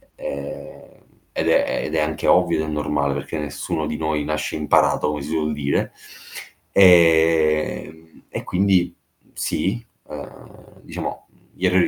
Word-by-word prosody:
ehm, 70 0 -8 0.3
ed - - +1
è - - +2
ed - - -3
è - - +2
anche 75 0 -1
ovvio 80 - +3
ed 80 - -4
è - - -4
normale 75 -2 0
perché 70 +3 -5
nessuno 75 +1 -3
di 75 - -3
noi 80 -1 -1
nasce 75 0 -2
imparato 75 -1 +2
come 75 -1 -3
si 70 - -7
suol 75 -1 -1
dire. 70 -1 -1 0.8
E 80 -3 +4 0.3
e - - -5
quindi 90 -2 +2 0.4
sì, 115 +5 -2 0.2
ehm, 70 -3 -12
diciamo - - -6 0.3
gli 95 - -3
errori 90 0 +4
75 Hz, 140 wpm, -22 LUFS, 75-85 Hz, 0.8 s, E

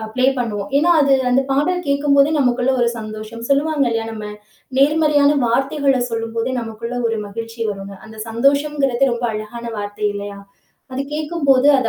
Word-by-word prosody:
அ - - -7
play 255 - +1
பண்ணுவோம். 220 -2 -3
ஏன்னா, 325 +5 +3
அது 280 -1 +4 0.2
அந்த 265 +2 +3
பாடல் 300 +7 +1
கேட்கும்போதே 280 0 +3
நமக்குள்ள 255 -1 +2
ஒரு 240 - +3
சந்தோஷம் 215 +1 -7
சொல்லுவாங்க 285 0 +2
இல்ல, 225 -1 0
நம்ம 215 -1 -7 0.5
நேர்மறையான 295 0 +4
வார்த்தைகள 270 +2 +1
சொல்லும்போதே 230 +1 -2
நமக்குள்ள 230 +1 -6
ஒரு 225 - -1
மகிழ்ச்சி 230 +2 -7
வருங்க. 195 0 -7
அந்த 220 0 -12
சந்தோஷம்கிறது 275 +1 +2
ரொம்ப 235 +1 -3
அழகான 215 +2 -6
வார்த்தை, 205 +1 -5
இல்லையா? 200 0 -6 0.5
அது 265 - -2
கேட்கும்போது, 295 -4 +2
அது 235 - +1
250 Hz, 150 wpm, -19 LUFS, 225-280 Hz, 0.5 s, அது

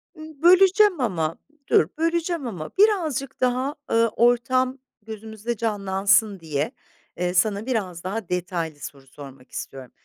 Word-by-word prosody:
Imm, 310 -2 -12
böleceğim 375 +1 +5
ama 165 -9 -1 0.3
dur, 155 - +4
böleceğim 330 -3 -1
ama 170 -8 -6
birazcık 325 - +1
daha, 255 +3 0 0.2
ııı, 230 0 +4
ortam 255 +3 +2 0.2
gözümüzde 220 +1 -6
canlansın 200 -1 +1
diye, 155 -2 -2 0.5
eee, 180 0 -1
sana 200 +3 +1
biraz 195 -9 -3
daha 195 +1 -4
detaylı 170 -4 -3
soru 140 -2 -10
sormak 135 -1 -13
istiyorum. 130 -2 -8
220 Hz, 125 wpm, -23 LUFS, 175-270 Hz, 0.5 s, böleceğim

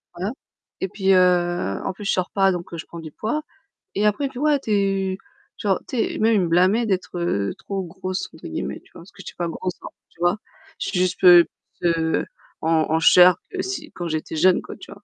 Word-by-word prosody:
voilà 190 +4 -3 0.5
et 190 - 0
puis, 195 0 0
heu, 175 - +2
en - - -2
plus, 200 +2 -10
je - - +1
sors 185 -1 0
pas 195 -1 +3
donc 175 -1 -5
je 165 - -7
prends 170 - -10
du 155 -1 -9
poids 230 - -2 0.5
et 210 +2 +1
après 210 +7 +1
il - - +1
me - - -18
fait: 250 - -7
«Ouais, 300 -1 +3
tu 225 -5 -5
es» 195 -2 +1 0.4
tu 210 - -5
vois? 190 - +2
Tu 255 - -4
sais? 225 - 0
Même 220 +1 +3
il 200 - +3
me 175 - 0
blâmait 185 +7 +3
d'être, 185 -2 -2
heu, 100 - -1
«trop 195 -1 -4
grosse» 185 +2 -5
entre 160 - -10
guillemets, 70 -4 -4
tu - - -26
vois? - - -12
Parce 180 - -16
que - - -13
je - - -13
suis - - -8
pas 175 - -2
grosse, 180 +2 -4 0.3
tu - - -28
vois? 175 +4 +2 0.4
Je - - -2
suis 180 - -1
juste, 185 0 0
heu, 175 -2 +9 0.3
plus 165 -2 +1 0.4
en 160 -1 +2
en 160 - +3
chair 180 +1 +7
que 380 - -3
si 315 -5 -5
quand 175 - -5
j'étais 155 0 -3
jeune, 180 +3 +4
quoi, - - -9
tu - - -13
vois? 200 +1 -13
185 Hz, 250 wpm, -22 LUFS, 170-200 Hz, 0.5 s, heu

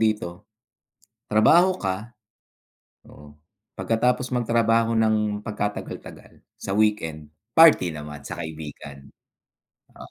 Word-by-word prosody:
dito, 105 -6 -2 0.8
trabaho 170 - +4
ka, 100 +5 -5 0.9
oo, 75 0 -15 0.5
pagkatapos 125 +3 0
magtrabaho 115 -1 +2
ng 105 -2 +1
pagkatagal-tagal, 105 -1 -7 0.2
sa 95 - -4
weekend, 80 -9 -1 0.2
party 150 - +6
naman 75 0 -8
sa - - -6
kaibigan. 75 -3 -9 0.9
Oh, - - -13
105 Hz, 90 wpm, -24 LUFS, 80-115 Hz, 0.9 s, party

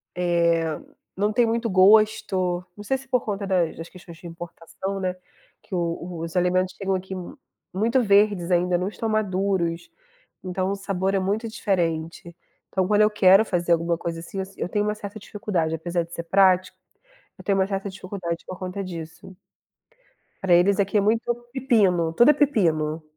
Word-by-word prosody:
eh, 170 -2 +2 0.5
não 205 +2 0
tem 240 +1 +3
muito 230 +1 -1
gosto. 190 -2 +3
Não 205 - -10
sei 265 +6 0
se 270 0 -15
por 250 -1 +1
conta 200 -1 -3
das 180 -4 0
das 165 - -7
questões 175 -2 -13
de 175 - -16
importação, 175 +3 -7
né, 185 -1 -2 0.5
que 190 - -7
o - - 0
o 170 0 -4
os 165 +1 -7
alimentos 185 +1 +1
chegam 195 -1 -1
aqui 190 +1 -5
mu 185 - -8 0.4
muito 230 +7 +2
verdes 200 -4 +3
ainda, 180 0 +2
não 180 - -2
estão 220 +2 -4
maduros, 190 -5 -1 0.5
então 185 +1 -2
o - - -1
sabor 195 -1 -2
é 195 - +2
muito 205 +5 -1
diferente. 170 -4 -2 0.3
Então 190 -1 0
quando 210 +1 +3
eu 215 - +5
quero 195 0 +6
fazer 175 -4 +1
alguma 170 0 0
coisa, 170 0 -4
assim, 195 +3 -7
eu 190 - -2
si 195 +1 -18
eu - - 0
tenho 205 +2 0
uma 210 - -1
certa 210 0 -8
dificuldade, 195 -7 -2
apesar 170 +2 -2
de 170 +1 -14
ser 170 - -5
prático, 185 +1 +3 0.6
eu - - -13
tenho 195 -1 +1
uma 190 - +2
certa 195 0 -3
dificuldade 185 -3 -6
por 185 - -7
conta 185 +2 -5
disso. 165 +1 -9 1.1
Pra 190 -2 +2
eles 190 +3 +4
aqui 200 +1 +1
é - - +4
muito 225 +3 +1 0.2
pepino, 200 - +2
tudo 240 - +5
é - - +7
pepino. 165 - +1
190 Hz, 185 wpm, -24 LUFS, 175-205 Hz, 1.1 s, é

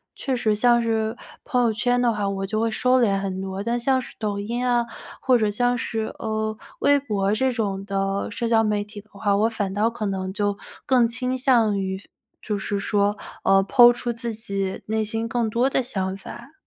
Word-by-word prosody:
确 265 -2 -2
实 215 -2 +1
像 240 +2 +4
是 225 0 -1 0.3
朋 250 -4 +1
友 225 -2 +2
圈 245 +3 +1
的 240 -2 +2
话， 205 -2 -1
我 195 0 -2
就 215 +2 -1
会 230 - +1
收 250 +3 +2
敛 195 -4 +2
很 190 -1 -3
多， 190 +1 -4
但 235 +1 0
像 260 +2 +2
是 - - -8
抖 205 -2 -2
音 235 +4 -3
啊， 240 -1 +2 0.3
或 255 -2 +3
者 215 -1 +2
像 245 +4 +1
是， 225 -2 -3
呃， 215 0 -2 0.3
微 285 0 +5
博 205 -6 0
这 260 +3 +1
种 200 -5 -2
的 195 0 -1
社 230 +2 -3
交 225 -1 +4
媒 210 -1 0
体 210 0 -11
的 215 - -32
话， 200 0 +1
我 220 +3 +3
反 200 -4 -2
倒 215 +3 +2
可 225 -2 -5
能 190 -1 -2
就 205 0 -1 0.3
更 250 -4 +4
倾 250 +2 -2
向 235 -6 +3
于 190 0 -3 0.4
就 210 -2 -2
是 200 +1 -2
说， 205 0 +1 0.3
呃 195 0 +5
，po 240 -2 +8
出 240 0 -3
自 230 -1 -4
己 195 -3 -4
内 220 0 0
心 225 +2 -3
更 230 -1 0
多 240 +4 +2
的 270 - +1
想 190 -6 -3
法。 240 +7 -11
220 Hz, 230 characters per minute, -23 LUFS, 200-240 Hz, 0.4 s, po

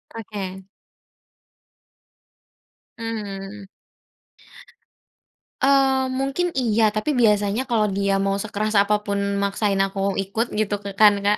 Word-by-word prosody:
Oke. 195 -4 -6 2.4
Mhm. 205 -3 -6 1.9
Eee, 270 -1 +3
mungkin 275 +7 -1
iya, 225 -4 +2
tapi 255 +6 -1
biasanya 210 +1 +2
kalau 215 -3 +2
dia 195 0 0
mau 195 0 0
sekeras 215 +1 -2
apa 210 +1 +3
pun 200 -1 -2 0.2
maksain 200 0 0
aku 195 0 -1
ikut 220 +5 -3
gitu 210 -1 -1
k 200 -1 -8
kan 210 +1 +6
Kak, 205 +1 +3
210 Hz, 105 wpm, -22 LUFS, 200-230 Hz, 2.4 s, kan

